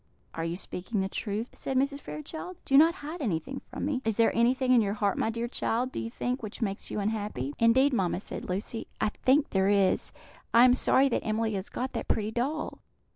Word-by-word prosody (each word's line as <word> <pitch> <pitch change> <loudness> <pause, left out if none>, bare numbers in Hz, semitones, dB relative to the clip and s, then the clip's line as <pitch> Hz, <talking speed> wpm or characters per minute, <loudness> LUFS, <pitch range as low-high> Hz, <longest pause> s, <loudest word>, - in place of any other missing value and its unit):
"Are 165 - -3
you 165 +1 -2
speaking 195 +2 -3
the 190 - 0
truth?" 210 +3 -3
said 265 - -2
Mrs. 280 +2 +1
Fairchild. 315 +5 -7
"Do 270 - +2
not 325 +4 +7
hide 320 +3 -6
anything 225 - -2
from - - -5
me. 280 -3 -1
Is 225 -2 0
there 230 +1 +3
anything 255 +2 +3
in 240 - +6
your 200 -1 -1
heart, 205 -2 +1
my - - 0
dear 230 +1 -2
child, 245 +1 -1
do - - -4
you 230 - -4
think, 250 +2 -3
which 215 -2 -7
makes 200 -4 -3
you - - -3
unhappy?" 205 - -2
"Indeed, 260 +5 +4
mamma," 185 -6 +1
said 195 - -6
Lucy, 200 +5 -3
"I - - +2
think 270 +7 +2
there 190 0 +2
is. 200 -2 +2 0.4
I 235 +2 +9
am 250 - +6
sorry 265 +1 +4
that - - -1
Emily 220 0 0
has 195 0 -3
got 255 +1 -4
that - - -4
pretty 215 0 0
doll. 275 +7 -2
230 Hz, 220 wpm, -29 LUFS, 205-260 Hz, 0.4 s, I